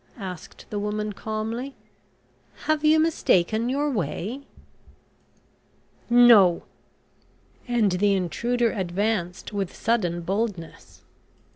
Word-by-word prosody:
asked 185 -6 -9
the 205 - -2
woman 210 0 -3
calmly. 220 +6 -4 0.9
"Have 310 -1 +1
you 310 +1 +5
mistaken 230 - +1
your 285 +3 0
way?" 210 - -3 1.7
"No," 235 -8 +6 1.0
and 235 -5 +2
the 200 +2 +2
intruder 235 +6 0
advanced 190 0 -2
with 195 -3 -3
sudden 180 -7 0
boldness. 190 -2 -4
215 Hz, 90 wpm, -24 LUFS, 185-240 Hz, 1.7 s, No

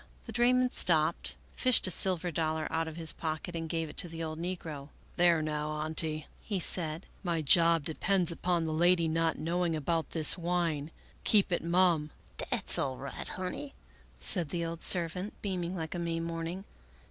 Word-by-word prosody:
The - - -7
drayman 250 +1 +2
stopped, 160 -1 +3 0.2
fished 255 -2 +4
a 185 - +2
silver 180 -1 0
dollar 160 0 -1
out 165 0 -1
of 160 - -7
his 160 -2 +3
pocket, 160 +2 -5
and 165 -1 -4
gave 165 -1 -2
it 150 - -12
to - - +1
the 165 0 -7
old 155 0 -5
negro. 160 -5 -6
" - - -29
There 170 -3 +3
now. 150 0 -3
Auntie," 155 0 +1 0.2
he 200 -3 -3
said, 165 -1 +1
" - - -30
my 170 -3 -1
job 165 +1 +5
depends 175 +2 0
upon 170 0 -1
the 160 - -2
lady 170 +1 +3
not 165 0 0
knowing 170 +1 -1
about 160 +2 -2
this 160 +2 +7
wine; 170 -4 -1 0.3
keep 205 -3 +3
it 175 - -1
mum." 170 -3 +2 0.2
" - - -29
Dat's - - 0
all 130 -2 -2
right, 140 0 -6
honey," 185 +10 -5 0.4
said 175 -6 0
the 170 +2 -3
old 165 0 -6
servant, 180 +3 -2
beaming 185 -3 -3
like 160 -3 -5
a 175 - -4
May 165 -1 -2
morning. 165 +3 -5
165 Hz, 185 wpm, -30 LUFS, 155-180 Hz, 0.4 s, this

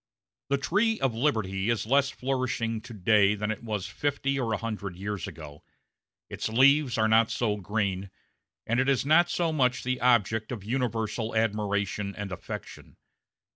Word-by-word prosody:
The 140 - +2
tree 215 +10 +1
of 135 -3 +1
liberty 110 -6 0
is 115 -4 0
less 140 +4 +3
flourishing 125 -4 -2
to 120 +1 -11
day 105 +1 +4
than 105 +1 -2
it 110 - -5
was 105 -4 -3
fifty 140 +6 -1
or 120 -3 -1
a 110 - +1
hundred 100 -4 -5
years 100 +1 -4
ago; 75 -2 -10 0.6
its - - -4
leaves 135 +3 +4
are 110 0 +3
not 110 0 +4
so 110 -4 0
green, 100 -1 -2 0.6
and 120 +2 +1
it 130 +1 +2
is 135 -1 +1
not 170 +4 +5
so 170 -2 0
much 125 -4 +1
the 130 0 -2
object 110 -2 +2
of 110 -6 -5
universal 115 -1 -2
admiration 105 -2 -1
and 100 -1 -6
affection. 90 - -8
115 Hz, 165 wpm, -27 LUFS, 105-130 Hz, 0.6 s, not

